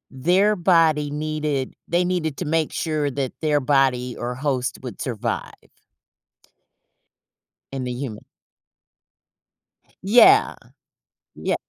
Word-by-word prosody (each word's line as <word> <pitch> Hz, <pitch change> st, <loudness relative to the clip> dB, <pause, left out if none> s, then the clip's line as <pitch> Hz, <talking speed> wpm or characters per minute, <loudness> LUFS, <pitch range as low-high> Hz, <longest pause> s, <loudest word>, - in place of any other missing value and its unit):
their 185 Hz, +10 st, +3 dB
body 165 Hz, -5 st, +3 dB
needed 150 Hz, -2 st, -3 dB
they 175 Hz, +2 st, +1 dB
needed 170 Hz, -5 st, -2 dB
to 180 Hz, -, -4 dB
make 160 Hz, 0 st, 0 dB
sure 155 Hz, -3 st, -1 dB
that 135 Hz, -2 st, -3 dB
their 150 Hz, -2 st, +2 dB
body 130 Hz, -3 st, +1 dB
or 120 Hz, +1 st, -4 dB
host 130 Hz, -2 st, -2 dB
would 125 Hz, -, -8 dB
survive 115 Hz, -2 st, -3 dB, 2.2 s
in 135 Hz, -1 st, -4 dB
the 125 Hz, -, -3 dB
human. 120 Hz, -4 st, -6 dB, 1.8 s
Yeah, 245 Hz, -, +6 dB, 0.8 s
yea -, -, -1 dB
150 Hz, 105 wpm, -22 LUFS, 130-165 Hz, 2.2 s, Yeah